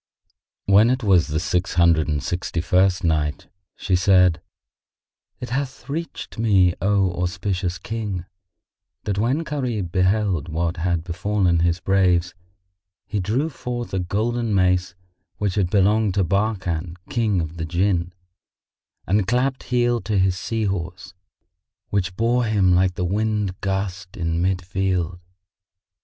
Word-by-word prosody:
When 100 +4 +5
it 130 0 0
was 95 -5 +4
the 80 0 -1
Six 90 0 -1
Hundred 85 -3 +4
and 75 -3 -1
Sixty 90 -1 -2
first 90 +1 +2
Night, 75 -3 -1 0.3
She 95 - 0
said, 90 -2 +4 1.0
It 125 - -7
hath 135 +1 -3
reached 165 -5 -5
me, 95 -6 +4
O 95 -1 +2
auspicious 90 0 -2
King, 100 -2 -4 0.8
that 100 -1 -2
when 130 +9 +1
Gharib 125 - -3
beheld 95 -2 +1
what 85 +2 -1
had 85 -1 0
befallen 90 0 0
his 85 +1 +1
braves 90 -2 +2 0.7
he 105 - -3
drew 110 - 0
forth 125 -6 -5
a 95 - 0
golden 110 +4 -1
mace 90 -1 +2 0.4
which 100 -3 -1
had 95 -4 +1
belonged 105 +1 +2
to 100 - +3
Barkan 90 -3 -1 0.2
King 110 -5 +1
of 80 0 -4
the 80 - -3
Jann 90 +1 0 0.9
and 100 0 +1
clapped 130 +3 0
heel 120 -1 +1
to 105 -2 -1
his 95 -1 +2
sea 110 +4 -3
horse, 90 -2 -4 0.8
which 95 -2 -1
bore 120 +3 +1
him 100 -5 +3
like 90 0 +2
the 90 - -1
wind 105 0 -1
gust 95 -1 -3
into 85 -2 -1
mid 90 0 0
field. 90 -2 -1
95 Hz, 140 wpm, -22 LUFS, 90-105 Hz, 1.0 s, When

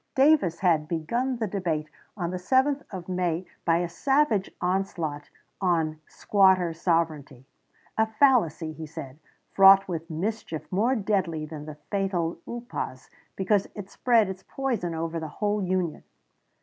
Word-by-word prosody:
Davis 270 - +4
had 165 -5 +2
begun 235 +12 -1
the 225 - -1
debate 175 -6 -2 0.3
on 175 -3 -2
the 185 - -3
7th 265 +8 +2
of 185 -3 -7
May 180 -1 -1 0.2
by 165 -1 +4
a 175 0 0
savage 230 - +1
onslaught 175 -5 -2 0.3
on 165 -4 +1
"Squatter 190 -4 +3
Sovereignty" 160 -6 -1 0.5
a 220 - +4
fallacy, 220 - +2
he 160 0 -8
said, 140 -2 -9 0.3
fraught 195 0 +7
with 165 -2 -5
mischief 170 -1 -3
more 225 +8 +2
deadly 190 -8 -1
than 150 -1 -8
the 155 - -7 0.2
fatal 190 -5 -1
upas, 235 - -6 0.2
because 195 +1 +1
it 200 -2 -8
spread 230 -4 +3
its 190 0 -6
poison 230 -11 -2
over 165 +1 -3
the 160 - -5
whole 210 0 0
Union. 180 -3 -1
185 Hz, 140 wpm, -26 LUFS, 165-210 Hz, 0.5 s, fraught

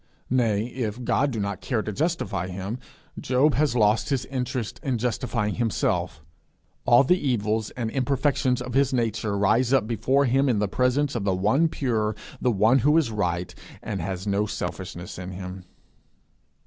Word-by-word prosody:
Nay, 115 -5 +2
if 120 -1 -4
God 140 +4 +2
do 115 -5 -3
not 100 -2 -3
care 110 -5 -1
to 105 - -4
justify 140 - -1
him, 95 +6 -5 0.4
Job 130 +4 +2
has 145 -3 +1
lost 110 +1 +3
his 135 -3 0
interest 130 -3 -3
in 135 -5 -1
justifying 115 -2 -1
himself. 115 -3 -1 0.6
All 120 +3 +6
the 180 +7 +3
evils 110 - 0
and 115 -3 -2
imperfections 135 -1 +1
of 125 0 -6
his 135 0 +3
nature 115 -4 0
rise 115 +5 +2
up 135 -5 +3
before 130 +5 +1
him 135 +2 +2
in 120 - +2
the 105 0 +1
presence 130 +6 +1
of 115 - -2
the 95 -2 +1
one 110 - +3
pure, 110 -8 -1 0.3
the 125 - +2
one 115 +4 +4
who 150 +6 +4
is 145 -8 +2
right, 90 -4 -2 0.3
and 100 -4 -3
has 95 +2 -4
no 100 +1 +1
selfishness 90 -3 -5
in 90 +1 -6
him. 90 0 -7
115 Hz, 170 wpm, -25 LUFS, 105-130 Hz, 0.6 s, All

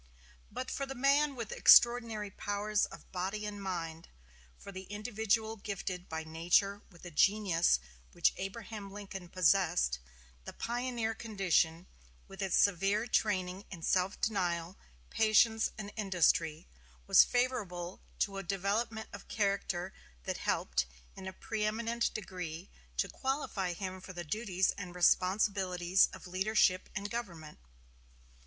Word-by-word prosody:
But 255 +4 -5
for 275 - -3
the 270 - -6
man 280 +2 +3
with 230 -4 -5
extraordinary 230 -4 +5
powers 205 +2 0
of - - -13
body 195 +3 -3
and 205 -1 -5
mind; 165 -4 -4 0.5
for - - -10
the 190 0 -8
individual 220 +1 -1
gifted 190 -3 -5
by 160 0 -3
nature 175 +5 +1
with 175 -3 -18
the 175 - -8
genius 185 - +3 0.3
which - - +2
Abraham 205 +1 -6
Lincoln 195 -3 -8
possessed; 165 - +2 0.4
the - - -8
pioneer 240 -1 -2
condition, 185 -6 +1 0.4
with 195 +1 -9
its 190 -3 +1
severe 200 +3 +3
training 190 -5 0
in 170 -4 -9
self 185 +3 +1
denial, 175 -4 -1 0.4
patience, 220 0 +4
and 205 -1 -7
industry, 170 -5 +1 0.4
was - - +8
favorable 195 -8 -2 0.2
to 195 -1 0
a - - -3
development 205 +4 -1
of 200 - -9
character 195 -3 -1 0.3
that - - -3
helped 60 0 0 0.3
in 190 - -8
a 190 - -5
preëminent 225 +3 -1
degree 180 -3 -6 0.3
to - - +1
qualify 265 -9 -2
him 185 +1 -5
for 185 - -9
the 175 -1 -5
duties 190 +1 0
and 180 -3 -8
responsibilities 185 0 +3
of - - -11
leadership 185 0 +2
and 200 +2 -4
government. 170 -10 -6
195 Hz, 130 wpm, -32 LUFS, 180-215 Hz, 0.5 s, was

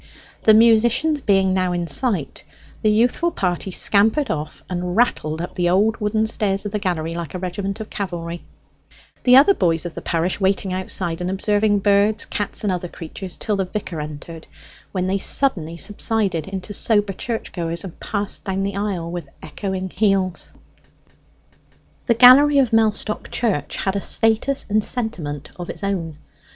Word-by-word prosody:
The 215 - +7
musicians 235 +7 +4
being 195 -4 +2
now 185 -1 0
in 175 -1 -2
sight, 170 - -1 0.4
the 215 - +3
youthful 240 +10 +2
party 180 - -2
scampered 220 +9 +2
off 150 0 -5
and 180 0 -3
rattled 160 -10 +1
up - - -6
the 175 -1 0
old 205 +5 +2
wooden 215 0 0
stairs 210 -3 0
of 205 - -3
the 210 - -2
gallery 170 -5 -2
like 170 -1 -6
a - - -1
regiment 195 +3 -4
of 220 - -7
cavalry; 170 -3 -5 0.8
the 250 0 +6
other 285 +9 +7
boys 165 - 0
of 175 - -5
the - - -7
parish 170 +3 -1
waiting 190 0 +1
outside 180 -2 -2
and 180 - -2
observing 205 +2 +1
birds, 205 +2 +3
cats, 205 +1 -3
and 200 -3 +1
other 180 0 -3
creatures 175 +2 -8
till 210 - -1
the 190 - 0
vicar 180 -5 -5
entered, 155 +2 -9 0.4
when 185 -2 -1
they 190 +1 0
suddenly 170 - 0
subsided 205 -3 -1
into 195 +1 -6
sober 205 -1 +2
church 225 +4 -4
goers, 170 -1 -3
and 185 -4 -9
passed 205 -1 -3
down 195 -1 -2
the 200 0 -3
aisle 195 -5 -3
with 170 -5 -6
echoing 190 +3 -4
heels. 195 -3 0 1.6
The 235 - +4
gallery 270 +5 +8
of 255 -5 +3
Mellstock 215 -1 +1
Church 185 -12 -1
had 195 0 -1
a 200 - -1
status 225 +7 +1
and 215 +1 +1
sentiment 170 - -4
of 175 -1 -7
its - - -6
own. 170 -6 -3
195 Hz, 165 wpm, -21 LUFS, 175-215 Hz, 1.6 s, gallery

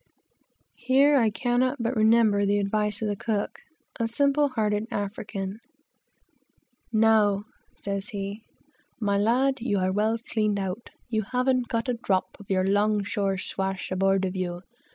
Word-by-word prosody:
Here 270 +4 +4
I 235 -5 +4
cannot 245 +4 0
but 235 +2 -1
remember 220 -2 +4
the 200 +1 +2
advice 210 +1 0
of - - 0
the 205 - -1
cook, 210 0 -3 0.4
a 230 - +1
simple 280 +4 +2
hearted 215 -3 -1
African. 200 -2 -4 1.3
"Now," 215 -3 +3 0.3
says 200 0 -4
he, 200 0 -5 0.6
"my 200 -2 +1
lad, 260 +6 +2
you 215 -4 0
are 185 0 +1
well 215 +3 +1
cleaned 215 -3 -1
out; 195 +3 -4 0.2
you 220 -2 0
haven't 250 +3 0
got 230 +1 -2
a 250 - +1
drop 200 -5 0
of 205 - -14
your 185 -1 +2
'long 205 +1 +2
shore 195 -1 -1
swash 190 0 -4
aboard 195 +1 +2
of 185 0 -3
you. 175 -1 -3
210 Hz, 150 wpm, -26 LUFS, 200-235 Hz, 1.3 s, Here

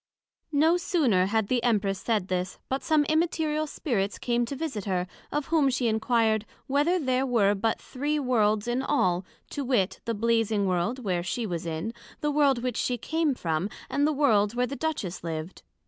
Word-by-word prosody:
No 320 +4 +4
sooner 275 - +2
had 220 0 +1
the 250 +1 +1
Empress 205 -5 +1
said 215 -5 0
this, 185 0 -2
but 265 +1 -1
some 310 -2 +2
Immaterial 310 -1 +1
Spirits 210 -10 -2
came 240 0 0
to 275 - -5
visit 270 -9 -4
her, 185 -3 0 0.3
of 295 -1 -2
whom 310 -4 +4
she 250 -1 0
inquired, 220 -1 +2 0.2
Whether 290 +6 +2
there 260 -5 +1
were 225 -6 +3
but 220 +3 0
three 290 +4 -2
Worlds 215 -6 +2
in 240 +2 0
all, 185 -11 +1 0.3
to 285 - -3
wit, 240 -7 +1
the 230 - -1
Blazing 225 -2 +1
World 185 +6 0
where 180 -4 0
she 225 +7 -2
was 175 -3 -4
in, 165 +8 -3 0.3
the 295 - 0
World 280 -4 +3
which 250 -3 -1
she 250 - 0
came 315 +3 0
from, 165 -1 -1 0.2
and 285 +1 +2
the - - +2
World 225 -8 +3
where 250 +1 +2
the 275 - -5
Duchess 275 - -3
lived? 160 +1 -5
235 Hz, 185 wpm, -27 LUFS, 200-285 Hz, 0.3 s, No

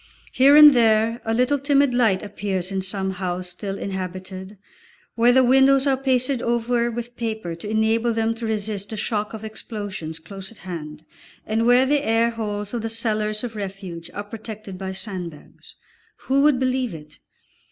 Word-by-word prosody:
Here 275 +3 +6
and 300 -1 +10
there 225 -1 +3
a 225 - -1
little 250 +5 +2
timid 280 -1 +3
light 220 -6 +2
appears 195 -2 -3
in 195 -1 -1
some 190 0 -2
house 180 -1 -4
still 195 +2 -5
inhabited, 190 +1 -6 0.6
where 235 +1 +4
the 260 +1 +5
windows 265 +2 +5
are 275 -1 +3
pasted 260 -1 +1
over 235 0 0
with 240 +1 -6
paper 220 -7 -4
to 170 +5 -7
enable 220 +2 +2
them 225 0 0
to 230 0 -5
resist 210 -2 -3
the 220 - -5
shock 210 0 -2
of 220 - -9
explosions 205 -7 -6
close 190 +4 -9
at 225 - -16
hand, 155 -3 -7 0.4
and 225 +2 0
where 245 +2 +6
the 290 +1 +1
air 230 0 +2
holes 210 -2 -4
of 240 - -2
the 225 - -3
cellars 215 -1 -1
of 235 -2 -5
refuge 190 -4 -6
are 205 - -3
protected 215 -2 -8
by 190 0 -5
sandbags. 185 -6 -7 0.5
Who 270 +1 +2
would 290 -3 +4
believe 255 -5 0
it? 150 -1 -13
220 Hz, 175 wpm, -23 LUFS, 190-240 Hz, 0.6 s, and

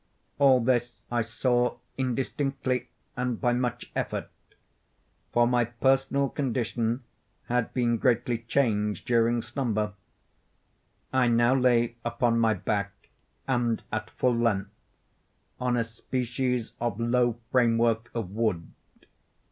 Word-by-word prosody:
All 135 -2 +6
this 120 -2 0
I 120 -1 +2
saw 120 +2 +1 0.2
indistinctly 130 0 -1 0.3
and 125 -2 -2
by 120 -1 +2
much 125 0 -2
effort—for 120 0 -4
my 120 0 +2
personal 135 +3 +1
condition 120 -3 -1 0.4
had 125 -1 0
been 120 -2 +2
greatly 120 -2 +1
changed 110 -4 0
during 120 -1 +2
slumber. 110 -4 -1 1.2
I 130 -1 +4
now 120 +1 +4
lay 120 -3 +2
upon 120 0 +1
my 110 -1 +3
back, 100 +1 -3 0.4
and 120 -3 0
at 110 0 -3
full 125 -1 +1
length, 105 -4 0 0.9
on 125 -1 +1
a 115 - +2
species 125 +1 -2
of 120 -3 -1
low 120 0 +2
framework 115 -2 +2
of 110 -6 -3
wood. 105 -6 -1
120 Hz, 110 wpm, -27 LUFS, 115-125 Hz, 1.2 s, All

